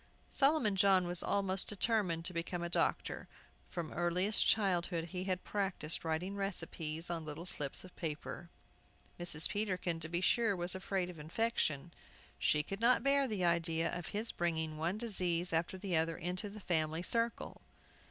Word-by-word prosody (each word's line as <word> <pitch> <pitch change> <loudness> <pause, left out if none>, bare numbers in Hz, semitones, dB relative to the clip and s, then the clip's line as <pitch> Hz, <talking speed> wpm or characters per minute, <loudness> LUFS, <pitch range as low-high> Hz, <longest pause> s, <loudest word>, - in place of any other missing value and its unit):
Solomon 275 -8 +3
John 190 -1 +4
was 175 0 +1
almost 195 -1 0
determined 200 -6 0
to 185 - 0
become 170 +1 -3
a 175 - -3
doctor. - - 0 0.4
From 170 -3 -5
earliest 180 +5 +2
childhood 175 -5 +2
he 185 +1 -4
had 185 -1 -2
practiced 195 -6 -2
writing 165 +5 -2
recipes 170 -4 0
on 165 -2 -3
little 155 +2 -7
slips 145 -6 -2
of 185 - -14
paper. 165 +2 -5 0.7
Mrs. 170 -2 +5
Peterkin, 185 -5 -2
to 155 0 -5
be 170 +1 0
sure, 225 +2 +2
was 175 0 -2
afraid 190 -1 -2
of 165 - -13
infection. 165 - -1 0.5
She 150 0 +2
could 195 +6 -6
not 245 +2 +4
bear 275 0 +3
the 205 -6 -1
idea 165 -1 +1
of 175 -2 -5
his 215 +3 +2
bringing 160 -2 -2
one 170 +5 -1
disease 180 -6 +1
after 165 +3 0
the 185 -2 -2
other 160 0 +1
into 180 +4 -3
the 210 +1 -10
family 160 -2 0
circle. 230 +3 0
175 Hz, 160 wpm, -35 LUFS, 165-200 Hz, 0.7 s, Mrs